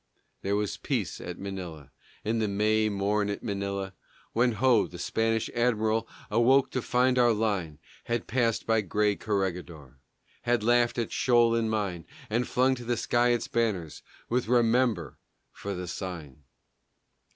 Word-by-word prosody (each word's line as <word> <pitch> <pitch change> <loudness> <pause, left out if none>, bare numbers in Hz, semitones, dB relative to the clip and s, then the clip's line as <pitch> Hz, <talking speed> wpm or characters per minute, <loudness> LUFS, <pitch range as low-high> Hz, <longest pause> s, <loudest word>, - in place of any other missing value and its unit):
There 100 +1 0
was 105 -1 -1
peace - - -2
at - - -6
Manila, 90 -7 -7 0.3
In 115 +2 0
the 110 - +1
May 110 +2 +2
morn 100 +1 0
at 100 - -4
Manila, 100 -2 -3 0.4
When 120 +1 +3
ho, 120 0 +3
the 90 - -10
Spanish 115 +4 0
admiral 115 -2 +1 0.2
Awoke 125 +5 +4
to 130 - -1
find 125 +1 +2
our 120 -1 +5
line 100 -8 -1 0.3
Had 120 -1 -1
passed 115 -1 0
by 110 -1 +3
gray 105 +1 +1
Corregidor, 90 - -3 0.4
Had 120 -2 +1
laughed 120 +1 +3
at 115 -2 -2
shoal 120 -2 +3
and 115 -1 +1
mine, 100 -6 -2 0.2
And 120 +3 +1
flung 130 +1 +3
to 120 - -8
the 120 0 -1
sky 120 +2 +2
its 120 -1 +1
banners 100 -10 -1 0.3
With 125 -1 0
"Remember" 115 - +2 0.3
for 100 -1 -5
the 90 0 -5
sign! 85 -6 -7
110 Hz, 150 wpm, -28 LUFS, 100-120 Hz, 0.4 s, our